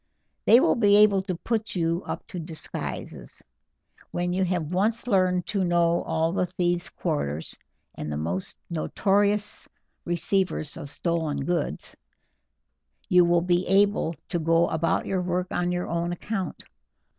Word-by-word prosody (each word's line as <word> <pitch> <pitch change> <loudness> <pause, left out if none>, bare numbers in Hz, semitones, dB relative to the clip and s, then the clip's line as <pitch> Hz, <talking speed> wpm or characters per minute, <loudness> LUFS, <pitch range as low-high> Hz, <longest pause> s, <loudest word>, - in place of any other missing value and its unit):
They 235 - +8
will - - +4
be 205 -4 +4
able 205 -2 +6
to 190 -1 -3
put 220 +4 -2
you 170 0 0
up - - -4
to 185 -6 -6
disguises. 160 -1 -6 0.7
When 175 0 -1
you 190 +1 +1
have 175 -3 -2
once 215 +6 +1
learned 185 -5 +2
to 195 -2 +1
know 170 -1 +2
all 160 +1 0
the 180 0 0
thieves' 175 0 0
quarters 70 +2 -3 0.4
and 75 - -5
the 75 - -2
most 85 +5 -1
notorious 205 +5 +1 0.3
receivers 175 -2 0
of 140 - -7
stolen 160 -3 -1
goods, 170 -4 -2 1.1
you 180 -1 +6
will 170 0 +3
be 180 0 +1
able 195 -3 +3
to 175 - -1
go 165 +1 +3
about 165 +1 0
your 190 -2 -1
work 180 +1 -2
on 175 0 0
your 180 0 -2
own 170 +1 -1
account. 190 -1 -4
175 Hz, 145 wpm, -26 LUFS, 165-195 Hz, 1.1 s, They